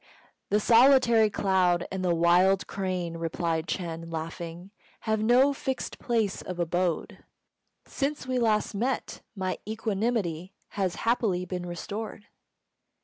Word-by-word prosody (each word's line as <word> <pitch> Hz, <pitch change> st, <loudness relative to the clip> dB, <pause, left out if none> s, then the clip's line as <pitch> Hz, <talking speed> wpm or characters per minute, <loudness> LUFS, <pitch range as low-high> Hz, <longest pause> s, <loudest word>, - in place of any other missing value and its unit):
"The 210 Hz, -, +3 dB
solitary 235 Hz, -1 st, +5 dB
cloud 185 Hz, -4 st, +1 dB
and 190 Hz, -1 st, -3 dB
the 175 Hz, -2 st, +2 dB
wild 180 Hz, +3 st, +4 dB
crane," 180 Hz, -3 st, -3 dB
replied 165 Hz, 0 st, -2 dB
Ch'êng, 165 Hz, -2 st, -4 dB
laughing, 165 Hz, +3 st, -6 dB, 0.3 s
"have 220 Hz, -1 st, 0 dB
no 250 Hz, +5 st, +4 dB
fixed 265 Hz, -1 st, -4 dB
place 225 Hz, -5 st, 0 dB
of 180 Hz, -, -6 dB
abode. 175 Hz, 0 st, -1 dB, 0.6 s
Since 285 Hz, 0 st, -3 dB
we 255 Hz, -1 st, 0 dB
last 220 Hz, -2 st, +1 dB
met 245 Hz, +6 st, -2 dB
my 185 Hz, -2 st, -3 dB
equanimity 210 Hz, -5 st, -2 dB
has 190 Hz, -4 st, -2 dB
happily 215 Hz, -6 st, +1 dB
been 180 Hz, 0 st, -5 dB
restored." 205 Hz, +4 st, -6 dB
190 Hz, 120 wpm, -27 LUFS, 175-225 Hz, 0.6 s, solitary